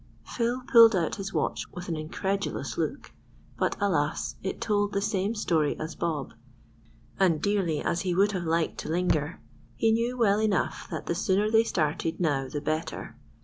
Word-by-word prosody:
Phil 245 +2 -2
pulled 230 -4 +8
out 170 -1 0
his 195 -1 -5
watch - - -1
with 180 0 -7
an 170 - -2
incredulous 190 +6 -3
look; - - -3 0.5
but, - - +1
alas! 160 -7 0
it 190 - -4
told 205 -1 0
the 200 - +1
same 205 +1 -1
story 160 -8 +1
as 155 +2 -4
Bob, 155 -5 -3 0.9
and 175 -5 +3
dearly 190 -6 0
as 170 - 0
he 180 -3 -1
would 200 +3 +4
have 185 -3 -2
liked 165 0 0
to - - -5
linger, 160 -2 0 0.4
he 225 - +2
knew 235 +3 0
well 210 -3 +3
enough 210 -3 0
that - - -5
the - - 0
sooner 200 +4 +1
they 225 0 +5
started 160 -5 -1
now 145 -6 +1
the 145 +3 -4
better. 155 +2 -3
185 Hz, 175 wpm, -27 LUFS, 160-210 Hz, 0.9 s, pulled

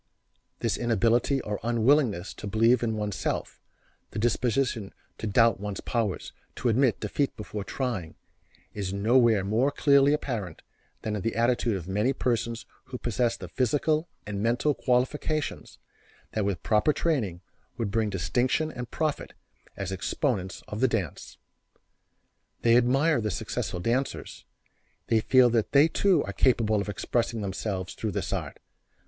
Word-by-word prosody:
This - - 0
inability 120 +3 +2
or 105 -1 -4
unwillingness 115 - +2
to 105 - -8
believe 115 +4 +3
in 110 -2 -1
one's 105 -2 -2
self; - - -3 0.5
the - - -9
disposition 120 -1 0 0.2
to 110 - -3
doubt 115 +2 +4
one's 105 -1 -4
powers, 115 -6 -2 0.2
to 120 - 0
admit 125 +1 +2
defeat 135 +7 -1
before 105 -1 -5
trying, 100 - -3 0.6
is 100 -3 -3
nowhere 110 +1 +3
more 110 +8 +2
clearly 140 -1 +4
apparent 115 - -3 0.4
than 110 -1 -2
in 105 - -3
the 115 - -2
attitude 120 -2 +1
of 90 -2 -8
many 105 +7 +1
persons 115 -2 -1 0.2
who 125 - -6
possess 120 0 0
the 90 - -8
physical 150 - +1 0.2
and 100 -1 -4
mental 120 +6 +2
qualifications 145 +4 -1 0.5
that 110 -2 -1
with 100 -4 -2
proper 110 +8 +3
training 110 - -1 0.4
would 110 -4 -2
bring 110 0 +1
distinction 120 - 0
and 125 -3 -7
profit 155 -2 -2 0.4
as 95 -1 -4
exponents 95 - -2
of 105 - -5
the 130 - +4
dance. 100 - -4 1.3
They 115 0 +5
admire 135 +4 +3
the 105 - -1
successful 90 -1 -3
dancers; 120 +8 -2 0.6
they 115 - +4
feel 125 +1 +5
that 115 -2 0
they 145 +3 +7
too 190 +2 +2
are - - -5
capable 110 -5 +2
of 100 - -5
expressing 115 +3 -1
themselves 95 -1 -3
through 110 -3 -4
this - - -2
art. - - -4
115 Hz, 145 wpm, -27 LUFS, 105-130 Hz, 1.3 s, they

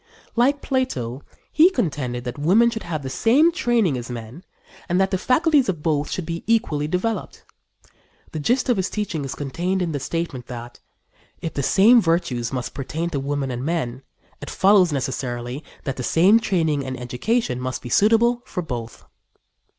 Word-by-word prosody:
Like 270 +5 +2
Plato, 140 - -2 0.3
he 320 +4 +6
contended 135 - -2
that 125 +2 -6
women 210 +10 +4
should 220 -1 -5
have 155 -4 -4
the 130 - -4
same 275 - +4
training 235 - +1
as 120 - -8
men 120 +7 -8 0.5
and 175 +2 +2
that 190 0 +2
the 190 - +1
faculties 285 - +3
of 165 -6 -3
both 150 -3 0
should 180 - -3
be 170 +1 -5
equally 155 -10 +1
developed. 185 +7 -3 0.9
The 155 - -4
gist 245 - +1
of 245 -4 +2
his 190 0 0
teaching 195 -8 -3
is 135 - -5
contained 175 +7 -2
in 175 -3 -1
the 145 - -2
statement 135 -3 -4
that: 120 -1 -8 0.6
"If 165 - -5
the 140 - -2
same 220 - +5
virtues 140 - 0
must 125 -2 -4
pertain 155 +6 -4
to 140 -4 -2
men 140 -1 -2
and 125 0 -4
women, 135 -6 -2 0.4
it - - -7
follows, 190 -3 +4
necessarily, 125 -1 -3 0.2
that 135 - -4
the - - -3
same 185 - +4
training 160 -9 0
and 130 -1 -5
education 125 - -1
must 130 0 -4
be 120 - -6
suitable 230 - +3
for 180 - -4
both." 120 -6 -6
160 Hz, 175 wpm, -22 LUFS, 130-210 Hz, 0.9 s, he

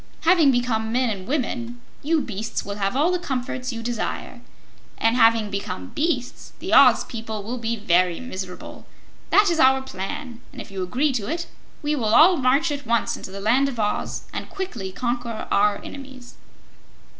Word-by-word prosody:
Having 330 -3 +5
become 240 -3 0
men 250 0 +1
and 190 -2 -6
women, 245 -4 -2 0.2
you 315 +1 +1
beasts 220 -2 -4
will 200 0 -5
have 195 +3 -1
all 305 +6 +3
the 360 - 0
comforts 255 -4 -3
you 230 -1 -6
desire, 235 -1 -4 0.6
and 225 +1 +2
having 225 -3 +4
become 145 - -4
beasts, 290 -6 -2
the - - -4
Oz - - +7
people 220 -3 -6
will 240 +4 -4
be 230 0 -1
very 180 -4 +2
miserable. 190 -7 -8 0.4
That 410 -3 +5
is 330 - 0
our 265 -2 +5
plan, 240 +3 -6
and - - -11
if - - -9
you 195 -1 -4
agree 255 +11 +1
to 225 -6 -3
it, 340 +1 -2 0.4
we 295 +1 +1
will 225 -5 +1
all 345 +6 +7
march 275 +5 +2
at 285 -4 -5
once 235 0 +1
into - - -8
the 195 +1 -7
Land 245 +7 +3
of 245 -4 -7
Oz 210 -1 -1
and - - -5
quickly 245 - -5
conquer 240 +1 -3
our 205 0 +3
enemies." 265 -3 -10
240 Hz, 180 wpm, -23 LUFS, 215-275 Hz, 0.6 s, Oz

